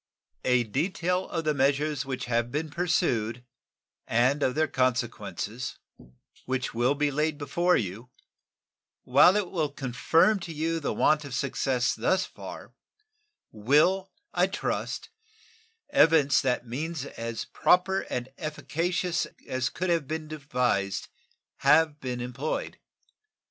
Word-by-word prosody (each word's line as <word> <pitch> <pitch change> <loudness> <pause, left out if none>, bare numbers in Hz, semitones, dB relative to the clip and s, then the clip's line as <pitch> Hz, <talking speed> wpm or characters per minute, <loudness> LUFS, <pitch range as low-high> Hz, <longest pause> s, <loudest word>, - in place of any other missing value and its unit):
A 125 -1 +4
detail 180 - -1
of 165 -1 -2
the 155 -1 +1
measures 140 +1 +1
which 130 -2 -3
have 120 0 0
been 150 +2 -3
pursued 125 - 0 0.6
and 125 +6 +2
of 130 -2 +1
their 155 0 +2
consequences, 125 -2 -2 0.7
which 130 0 -2
will 120 +5 +2
be 145 0 +1
laid 150 +1 0
before 170 +5 +2
you, 110 +4 -4 0.9
while 185 - +6
it 205 -4 -1
will 155 -5 0
confirm 145 - +2
to 170 -2 -7
you 165 +1 -1
the 150 - -2
want 155 0 +3
of 140 -4 -6
success 130 -1 0
thus 185 0 +1
far, - - -10 0.8
will, 150 - +2 0.2
I - - +3
trust, - - -3 0.8
evince 160 - +5
that 125 -2 0
means 145 +5 -4
as 115 -4 -5
proper 190 +2 +3
and 125 0 -3
as 155 - -2
efficacious 175 +3 -1 0.2
as 130 -2 -1
could 185 0 -2
have 165 -5 +1
been 155 +1 -4
devised 125 -10 -1 0.5
have 150 +1 +4
been 125 -2 -4
employed. 125 +5 -4
145 Hz, 130 wpm, -27 LUFS, 125-165 Hz, 0.9 s, while